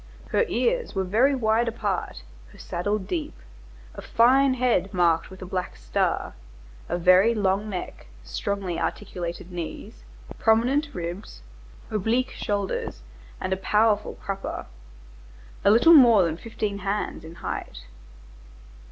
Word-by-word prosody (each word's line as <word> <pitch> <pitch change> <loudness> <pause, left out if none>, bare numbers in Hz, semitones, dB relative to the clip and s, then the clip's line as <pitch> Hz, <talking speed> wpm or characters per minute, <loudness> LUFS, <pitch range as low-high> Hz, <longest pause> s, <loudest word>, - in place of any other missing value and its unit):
Her 475 - +2
ears 485 - 0
were 190 - +1
very 235 +9 +3
wide 230 -1 +1
apart, 205 - -3 0.3
her - - -17
saddle 205 +5 -2
deep, 295 - -4 0.6
a - - -8
fine 260 +3 +4
head 240 -7 +1
marked 170 -2 +2
with 190 0 -10
a - - -6
black 185 0 -4
star, - - -1 0.6
a 175 - 0
very 185 +6 +5
long 200 0 0
neck, 180 - -6 0.2
strongly 180 - -3
articulated 175 -2 -4
knees, 170 - -7 0.4
prominent 250 +7 +3
ribs, 170 - -6 0.5
oblique 225 +5 0
shoulders 200 - -3 0.4
and 190 - -2
a - - -1
powerful 210 +2 +1
crupper. 195 0 -5 1.0
A - - +5
little 240 +11 +7
more 235 - +8
than 165 -2 -1
fifteen 205 +1 -4
hands 200 +2 -3
in 160 +1 -10
height." - - -6
200 Hz, 125 wpm, -25 LUFS, 180-230 Hz, 1.0 s, more